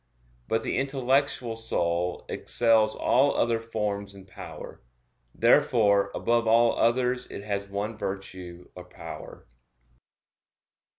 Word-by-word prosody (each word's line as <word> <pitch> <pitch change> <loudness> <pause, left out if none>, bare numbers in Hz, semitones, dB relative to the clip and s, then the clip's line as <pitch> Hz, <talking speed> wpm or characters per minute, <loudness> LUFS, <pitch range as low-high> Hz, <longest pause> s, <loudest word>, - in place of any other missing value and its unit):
But 115 0 0
the - - -2
intellectual 135 -3 0
soul 90 -5 -1
excels 110 -2 +2
all 135 +3 +2
other 115 -1 +1
forms 105 -3 -3
in 95 -1 -13
power. 95 - -10 0.5
Therefore 115 -6 +4
above 115 -1 +1
all 115 +1 +4
others 125 +1 +1
it 100 - -8
has 100 -1 -3
one 105 +2 -4
virtue 95 -3 -7
or 90 0 -10
power. 90 - -10
110 Hz, 110 wpm, -27 LUFS, 100-120 Hz, 0.5 s, Therefore